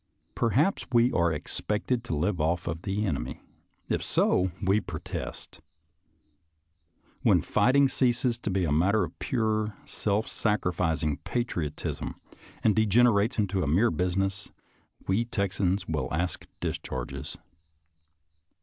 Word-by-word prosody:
Perhaps 135 Hz, -, +1 dB
we 120 Hz, +1 st, +4 dB
are 85 Hz, -1 st, +2 dB
expected 115 Hz, +8 st, -2 dB
to 80 Hz, -, -2 dB
live 85 Hz, +3 st, 0 dB
off 85 Hz, +3 st, 0 dB
of 80 Hz, 0 st, -3 dB
the 100 Hz, +3 st, -1 dB
enemy; 70 Hz, -6 st, -3 dB, 0.5 s
if -, -, 0 dB
so, 95 Hz, +1 st, +2 dB
we 100 Hz, +1 st, +3 dB
protest. 85 Hz, -4 st, -7 dB, 1.6 s
When -, -, +4 dB
fight 125 Hz, -, +2 dB
ing 140 Hz, -1 st, +6 dB
ceases 120 Hz, -2 st, +1 dB
to 105 Hz, -, -3 dB
be 95 Hz, -1 st, +1 dB
a 75 Hz, -, -1 dB
matter 95 Hz, +7 st, +3 dB
of 85 Hz, -1 st, -7 dB
pure, 110 Hz, -3 st, 0 dB
self 105 Hz, +1 st, -1 dB
sacrificing 90 Hz, -7 st, 0 dB
patriotism, 85 Hz, -11 st, -3 dB, 0.5 s
and 110 Hz, -, +4 dB
degenerates 110 Hz, +1 st, +4 dB
into 100 Hz, -3 st, +1 dB
a 85 Hz, -, 0 dB
mere 95 Hz, +11 st, +3 dB
business, 95 Hz, +3 st, -1 dB, 0.5 s
we 95 Hz, +5 st, +2 dB
Texans 100 Hz, -3 st, -1 dB
will 75 Hz, -5 st, -2 dB
ask 85 Hz, +2 st, -2 dB
discharges. 60 Hz, -1 st, -4 dB
95 Hz, 120 wpm, -28 LUFS, 85-110 Hz, 1.6 s, ing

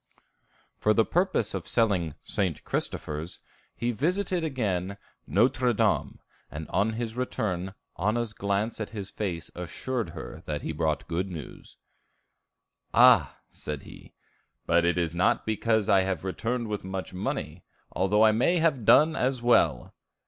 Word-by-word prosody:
For 105 Hz, 0 st, +3 dB
the 115 Hz, -, +4 dB
purpose 175 Hz, -, +1 dB
of 95 Hz, -4 st, -4 dB
selling 95 Hz, -10 st, +1 dB
"St. 90 Hz, -6 st, -2 dB
Christophers," 75 Hz, +3 st, -4 dB, 0.4 s
he 120 Hz, -, -2 dB
again 120 Hz, -, -3 dB
visited 175 Hz, -2 st, 0 dB, 0.7 s
Nôtre 120 Hz, +3 st, +3 dB
Dame; -, -, +1 dB, 0.3 s
and 80 Hz, +1 st, -7 dB
on 110 Hz, +2 st, +1 dB
his 115 Hz, 0 st, -4 dB
return, 95 Hz, -7 st, -2 dB, 0.2 s
Anna's 110 Hz, +4 st, 0 dB
glance 100 Hz, +3 st, -1 dB
at 105 Hz, -, -3 dB
his 100 Hz, -2 st, -6 dB
face 85 Hz, -6 st, -4 dB
assured 110 Hz, +5 st, -4 dB
her -, -, -8 dB
that 75 Hz, -1 st, -4 dB
he -, -, -2 dB
brought 80 Hz, -1 st, -1 dB
good 90 Hz, +3 st, -2 dB
news. 80 Hz, -7 st, -9 dB, 1.2 s
"Ah," 115 Hz, -, +6 dB
said 75 Hz, -2 st, -6 dB
he, -, -, -14 dB, 0.5 s
"but 85 Hz, 0 st, +3 dB
it 85 Hz, 0 st, +2 dB
is 85 Hz, -2 st, 0 dB
not 85 Hz, +1 st, +2 dB
because 110 Hz, -1 st, +1 dB
I 100 Hz, -3 st, +5 dB
have 95 Hz, -3 st, -2 dB
returned 115 Hz, +5 st, -2 dB
with 105 Hz, -2 st, -3 dB
much 95 Hz, 0 st, -5 dB
money, 90 Hz, -, -4 dB, 0.3 s
although 105 Hz, +4 st, +3 dB
I 110 Hz, -, +6 dB
may 125 Hz, +11 st, +2 dB
have 155 Hz, -9 st, +1 dB
done 155 Hz, +7 st, +6 dB
as 130 Hz, -1 st, 0 dB
well." 120 Hz, 0 st, +3 dB
105 Hz, 145 wpm, -27 LUFS, 90-120 Hz, 1.2 s, Ah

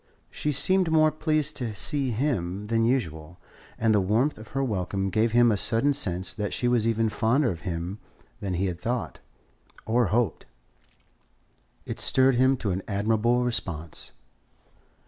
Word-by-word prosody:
She 150 Hz, -, -2 dB
seemed 185 Hz, +5 st, +4 dB
more 155 Hz, -1 st, +4 dB
pleased 155 Hz, -1 st, 0 dB
to 115 Hz, -5 st, -4 dB
see 140 Hz, +5 st, 0 dB
him 105 Hz, -7 st, -2 dB
than 115 Hz, +1 st, +1 dB
usual, 85 Hz, -, -2 dB, 0.4 s
and 110 Hz, -1 st, +2 dB
the 105 Hz, -, +3 dB
warmth 110 Hz, +9 st, +1 dB
of 110 Hz, -, -11 dB
her 135 Hz, +4 st, -2 dB
welcome 95 Hz, -4 st, -2 dB
gave 110 Hz, +4 st, +1 dB
him 120 Hz, -1 st, +5 dB
a 105 Hz, -, +1 dB
sudden 115 Hz, +8 st, +1 dB
sense 95 Hz, -10 st, -1 dB
that 105 Hz, -2 st, -4 dB
she 120 Hz, -, 0 dB
was 120 Hz, -2 st, +2 dB
even 115 Hz, 0 st, +1 dB
fonder 120 Hz, +5 st, +1 dB
of 85 Hz, -, -6 dB
him 85 Hz, +4 st, -4 dB, 0.4 s
than 95 Hz, -3 st, -3 dB
he 95 Hz, +3 st, 0 dB
had 90 Hz, -2 st, -4 dB
thought, 120 Hz, +2 st, -3 dB, 0.7 s
or 115 Hz, 0 st, +2 dB
hoped. 110 Hz, +4 st, -1 dB, 1.4 s
It -, -, -5 dB
stirred 130 Hz, 0 st, +3 dB
him 130 Hz, +2 st, +3 dB
to 105 Hz, -5 st, -2 dB
an 95 Hz, +2 st, -2 dB
admirable 110 Hz, +4 st, +1 dB
response. 85 Hz, -10 st, -3 dB
115 Hz, 160 wpm, -26 LUFS, 95-130 Hz, 1.4 s, him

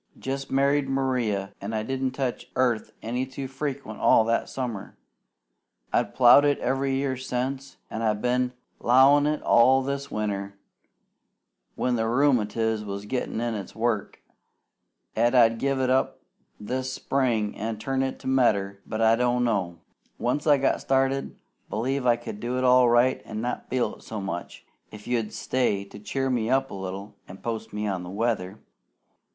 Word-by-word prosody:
Jest 135 Hz, +1 st, -4 dB
married 140 Hz, +1 st, +2 dB
Maria, 125 Hz, -8 st, -1 dB
an' 100 Hz, +3 st, -5 dB
I 110 Hz, -1 st, -1 dB
didn't 130 Hz, +1 st, -2 dB
touch 130 Hz, -2 st, -3 dB
earth 125 Hz, -4 st, +1 dB
any 120 Hz, +3 st, -2 dB
too 135 Hz, +1 st, -6 dB
frequent 135 Hz, -4 st, -5 dB
all -, -, +5 dB
that 115 Hz, +1 st, 0 dB
summer. 120 Hz, -7 st, -5 dB, 1.0 s
I've -, -, 0 dB
plowed 125 Hz, +3 st, +7 dB
it 145 Hz, -1 st, +3 dB
every 135 Hz, +1 st, 0 dB
year 135 Hz, -1 st, -1 dB
since, 130 Hz, +1 st, -4 dB
an' 110 Hz, -, -4 dB
I've 110 Hz, -2 st, +1 dB
been 125 Hz, +1 st, 0 dB, 0.3 s
'lowin' 145 Hz, +4 st, +4 dB
all 130 Hz, +3 st, +5 dB
this 140 Hz, +1 st, -3 dB
winter, 100 Hz, -2 st, -3 dB, 1.2 s
when 125 Hz, -1 st, 0 dB
the 110 Hz, 0 st, 0 dB
rheumatiz 115 Hz, -4 st, +1 dB
was 100 Hz, 0 st, -6 dB
gettin' 125 Hz, 0 st, -3 dB
in 120 Hz, 0 st, -1 dB
its 100 Hz, -3 st, -6 dB
work, 115 Hz, -2 st, -2 dB, 0.9 s
'at 120 Hz, +3 st, +2 dB
I'd 115 Hz, -2 st, +5 dB
give 135 Hz, -1 st, 0 dB
it 130 Hz, -1 st, +1 dB
up 130 Hz, -, +1 dB, 0.4 s
this 130 Hz, +5 st, -3 dB
spring 120 Hz, -6 st, 0 dB
an' 110 Hz, +1 st, -3 dB
turn 135 Hz, +4 st, -1 dB
it 135 Hz, 0 st, -2 dB
to -, -, -8 dB
medder; 100 Hz, -7 st, +2 dB
but 110 Hz, 0 st, -3 dB
I 115 Hz, 0 st, +5 dB
don't 125 Hz, +1 st, +1 dB
know. 95 Hz, -8 st, -1 dB, 0.4 s
Once 145 Hz, +6 st, -1 dB
I 145 Hz, -1 st, +6 dB
got 135 Hz, 0 st, +1 dB
started, 135 Hz, 0 st, 0 dB, 0.3 s
b'lieve 125 Hz, +4 st, -1 dB
I 120 Hz, -, +5 dB
could 105 Hz, -2 st, -8 dB
go 125 Hz, +2 st, -2 dB
it 130 Hz, -, -1 dB
all 125 Hz, -1 st, +6 dB
right 120 Hz, +2 st, +3 dB
an' 110 Hz, -, -6 dB
not 120 Hz, +1 st, -4 dB
feel 125 Hz, -1 st, -1 dB
it -, -, -19 dB
so 110 Hz, -, -6 dB
much, 95 Hz, -3 st, -6 dB, 0.2 s
if 105 Hz, -1 st, -12 dB
you'd 115 Hz, -3 st, -1 dB
stay 120 Hz, -6 st, 0 dB
to 100 Hz, +1 st, -12 dB
cheer 135 Hz, +5 st, -2 dB
me 115 Hz, -3 st, 0 dB
up 135 Hz, +1 st, +1 dB
a -, -, -7 dB
little 95 Hz, +2 st, -6 dB
an' 90 Hz, -, -10 dB
post 115 Hz, +1 st, -5 dB
me 105 Hz, +1 st, -3 dB
on 95 Hz, -3 st, -2 dB
the 90 Hz, -, -8 dB
weather. 100 Hz, -2 st, -2 dB
120 Hz, 170 wpm, -26 LUFS, 110-135 Hz, 1.2 s, plowed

